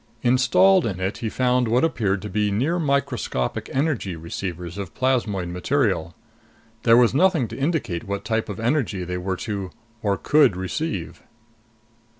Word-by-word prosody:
Installed 130 +9 +4
in 95 -4 -4
it 95 +2 -2
he 115 -3 -2
found 125 +1 +1
what 120 +3 +2
appeared 100 - 0
to 105 - -5
be 105 -1 +1
near 135 - 0
microscopic 140 - -1
energy 135 - -1
receivers 85 +2 -6
of 95 -4 -7
plasmoid 110 -9 0
material. 90 - 0 0.7
There 115 0 +5
was 120 -1 +5
nothing 165 -4 +3
to - - -7
indicate 135 - -2
what 100 0 -4
type 110 0 -1
of 105 - -5
energy 115 -6 0
they 90 0 -4
were 95 +1 -2
to 100 -4 -3 0.3
or 100 -2 0
could 145 -10 +4
receive. 95 - -4
110 Hz, 155 wpm, -23 LUFS, 95-130 Hz, 0.7 s, There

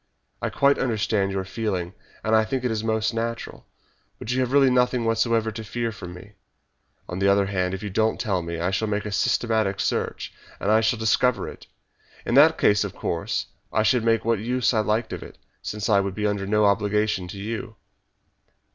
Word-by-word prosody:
I - - -1
quite 140 0 +3
understand 110 -5 0
your 95 -1 -2
feeling 95 -3 -3 0.3
and 110 +1 +2
I 110 - +5
think 130 +4 -3
it 125 - 0
is 110 -1 -2
most 110 0 0
natural, 115 +1 -4 0.5
but 115 - -5
you 125 - 0
have 130 -1 0
really 135 -2 +5
nothing 125 -1 +2
whatever 115 0 +1
to 110 +1 -7
fear 115 +1 -3
from 90 -4 -9
me. 100 +3 -13 0.7
On 90 - -5
the 100 - +2
other 100 0 +4
hand, 95 -1 -1
if 95 - -8
you 105 - -4
don't 110 +3 +1
tell 95 -4 0
me 85 0 -5
I 90 +2 0
shall 100 +3 0
make 105 0 -2
a 105 - -4
systematic 110 -1 +1
search, - - -2 0.3
and 100 - 0
I 110 +1 +5
shall 110 +1 +1
most 110 0 0
certainly 125 0 +3
discover - - -5
it. - - -13 0.6
In - - -1
that 150 +5 +6
case, 105 0 +3
of 100 - -6
course, 85 -1 -2 0.3
I 110 - +2
should 125 +1 +3
make 115 -1 +2
what 115 -2 +2
use 125 +3 0
I 110 - +2
liked 110 +2 0
of - - -5
it, - - -11 0.2
since 105 0 -4
I 100 -3 +4
should 100 -1 -4
be 105 - -2
under 100 -1 -1
no 105 +1 +3
obligation 105 -1 +1
to 95 - -8
you." 110 +3 -5
110 Hz, 215 wpm, -24 LUFS, 100-115 Hz, 0.7 s, that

